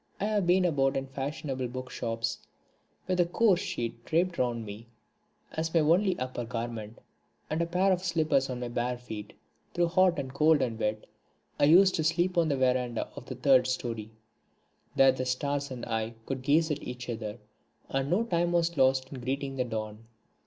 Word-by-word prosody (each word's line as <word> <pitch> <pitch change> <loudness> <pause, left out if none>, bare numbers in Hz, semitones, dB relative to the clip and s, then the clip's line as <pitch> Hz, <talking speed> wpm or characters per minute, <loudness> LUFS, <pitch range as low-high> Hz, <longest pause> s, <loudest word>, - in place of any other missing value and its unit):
I 200 - 0
have 210 -4 +1
been 180 +1 +4
about 135 -6 +2
in 135 - -2
fashionable 135 -1 -4
book 130 +1 -7
shops 115 -1 -2 0.7
with 185 -1 -1
a 175 - +5
coarse 195 0 +3
sheet 120 - -4
draped 170 +4 0
round 120 -3 0
me 105 +3 -9 0.6
as 160 +1 -2
my 165 - +6
only 180 +5 +3
upper 130 -1 -4
garment, 115 -2 -5 0.5
and 155 +2 0
a 170 - 0
pair 185 +3 +2
of 180 -1 0
slippers 160 -6 +1
on 125 -1 -4
my 120 - -2
bare 120 +1 -2
feet. 110 -4 -8 0.4
Through 175 -1 +2
hot 185 -1 +4
and 130 -2 -4
cold 150 0 +4
and 115 -3 -3
wet 105 -1 -1 0.5
I - - +5
used 185 +5 +6
to 160 - 0
sleep 175 +3 +1
out 170 - +5
on 160 - 0
the 140 - +1
verandah 125 -2 0
of 125 - -9
the 130 - -5
third 130 0 +4
storey. 115 -4 -3 0.9
There 135 0 +6
the 130 0 -3
stars 140 +3 -1
and 125 -2 -6
I 115 0 -2
could 135 -1 -3
gaze 155 +4 +3
at 150 - -2
each 125 0 -7
other, 110 -3 -4 0.5
and 135 +1 -1
no 190 +8 +2
time 175 -5 0
was 170 -1 +1
lost 130 0 +3
in 130 - -6
greeting 135 +2 -3
the 125 - 0
dawn. 110 -1 -5
135 Hz, 195 wpm, -29 LUFS, 120-170 Hz, 0.9 s, my